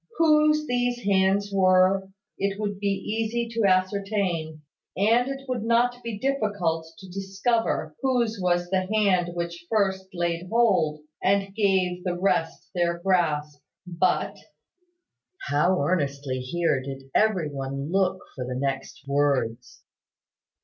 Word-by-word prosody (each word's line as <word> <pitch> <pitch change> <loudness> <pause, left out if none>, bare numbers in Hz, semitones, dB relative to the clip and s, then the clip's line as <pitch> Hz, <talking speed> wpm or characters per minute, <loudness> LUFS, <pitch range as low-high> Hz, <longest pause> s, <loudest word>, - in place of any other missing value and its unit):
Whose 305 -1 +4
these 245 -2 0
hands 195 +1 +2
were, 190 0 +4 0.3
it 200 0 -1
would 205 -2 -3
be 200 - -1
easy 220 +4 -1
to 230 -2 0
ascertain; 185 -4 0 0.3
and 230 +6 +3
it 270 0 -6
would 250 -3 -2
not 240 +2 +2
be 230 -3 -5
difficult 205 -11 -1
to 190 - -12
discover 195 -3 -1
whose 240 -5 +1
was 175 -1 +1
the 185 -1 +1
hand 185 -5 +2
which 170 0 -5
first 195 -3 +1
laid 175 0 -2
hold, 205 -10 +2 0.2
and 195 0 +1
gave 190 -4 +1
the 175 -1 -2
rest 180 -4 0
their 170 -1 0
grasp. 155 -5 0 0.2
But 180 +1 0 0.5
" 370 +2 -17
How 175 +6 +3
earnestly 140 -4 -1
here 140 +1 0
did 135 0 -8
every 190 -8 +2
one 140 +2 -4
look 190 -1 +1
for 130 - -5
the 125 0 -4
next 135 +1 -3
words! 135 -5 -1
190 Hz, 130 wpm, -25 LUFS, 165-215 Hz, 0.5 s, Whose